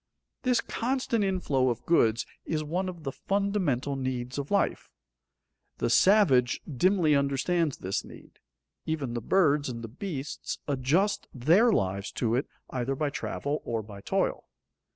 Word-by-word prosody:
This 250 Hz, -1 st, +2 dB
constant 240 Hz, -3 st, -1 dB
inflow 155 Hz, -9 st, +1 dB
of 120 Hz, -, -3 dB
goods 115 Hz, -9 st, +3 dB, 0.2 s
is 155 Hz, -1 st, -2 dB
one 180 Hz, +5 st, -2 dB
of 175 Hz, -3 st, -9 dB
the 135 Hz, -, -3 dB
fundamental 185 Hz, -9 st, 0 dB
needs 130 Hz, -1 st, -3 dB
of 140 Hz, -, -4 dB
life. 200 Hz, -1 st, 0 dB, 0.9 s
The -, -, 0 dB
savage 160 Hz, -, +5 dB
dimly 165 Hz, +2 st, +2 dB
understands 140 Hz, +3 st, +1 dB
this 95 Hz, +1 st, -2 dB
need. -, -, -14 dB, 0.5 s
Even 145 Hz, -6 st, -2 dB
the 120 Hz, -, -3 dB
birds 150 Hz, -, +2 dB
and 115 Hz, -2 st, -6 dB
the -, -, -4 dB
beasts 145 Hz, -, -5 dB
adjust 145 Hz, +9 st, +1 dB
their 170 Hz, -, +4 dB
lives 100 Hz, -, 0 dB
to 115 Hz, -1 st, 0 dB
it 130 Hz, +3 st, 0 dB, 0.2 s
either 130 Hz, +1 st, -1 dB
by 145 Hz, +1 st, -1 dB
travel 145 Hz, +1 st, -3 dB
or 115 Hz, -2 st, -2 dB
by 100 Hz, -1 st, -11 dB
toil. -, -, -1 dB
145 Hz, 145 wpm, -28 LUFS, 125-185 Hz, 0.9 s, savage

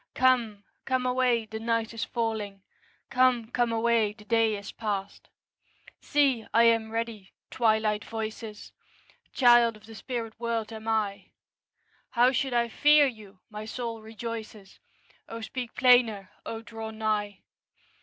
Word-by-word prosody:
Come, 240 Hz, -5 st, +2 dB, 0.2 s
come 255 Hz, -1 st, 0 dB
away, 250 Hz, -2 st, +2 dB
the 220 Hz, 0 st, -7 dB
night 230 Hz, 0 st, -1 dB
is 230 Hz, -, -3 dB
falling; 215 Hz, -4 st, -3 dB, 0.5 s
'Come, 250 Hz, -3 st, +2 dB
come 240 Hz, -1 st, +1 dB
away, 225 Hz, -2 st, +2 dB
the 210 Hz, -1 st, -17 dB
day 225 Hz, -1 st, +2 dB
is 200 Hz, -, -8 dB
past.' 200 Hz, -3 st, -4 dB, 0.7 s
See, 275 Hz, -6 st, +2 dB
I 230 Hz, -, +7 dB
am 225 Hz, -1 st, +3 dB
ready, 225 Hz, -3 st, -5 dB, 0.2 s
Twilight 220 Hz, -2 st, +1 dB
voices! 220 Hz, -1 st, -6 dB, 0.6 s
Child 240 Hz, -3 st, +5 dB
of 215 Hz, -, -18 dB
the 225 Hz, -, -12 dB
spirit 230 Hz, -1 st, -5 dB
world 230 Hz, -1 st, -2 dB
am 220 Hz, 0 st, -9 dB
I; 215 Hz, -3 st, -1 dB, 0.8 s
How 245 Hz, +1 st, +4 dB
should 265 Hz, +1 st, -1 dB
I 235 Hz, 0 st, +2 dB
fear 295 Hz, +5 st, +5 dB
you? 210 Hz, -7 st, -7 dB
my 210 Hz, 0 st, -6 dB
soul 230 Hz, 0 st, -5 dB
rejoices, 220 Hz, -2 st, -8 dB, 0.5 s
O 230 Hz, -, -6 dB
speak 245 Hz, +1 st, -6 dB
plainer! 245 Hz, -6 st, +4 dB, 0.2 s
O 225 Hz, 0 st, -5 dB
draw 225 Hz, 0 st, -7 dB
nigh! 215 Hz, -2 st, -2 dB
225 Hz, 135 wpm, -28 LUFS, 215-240 Hz, 0.8 s, I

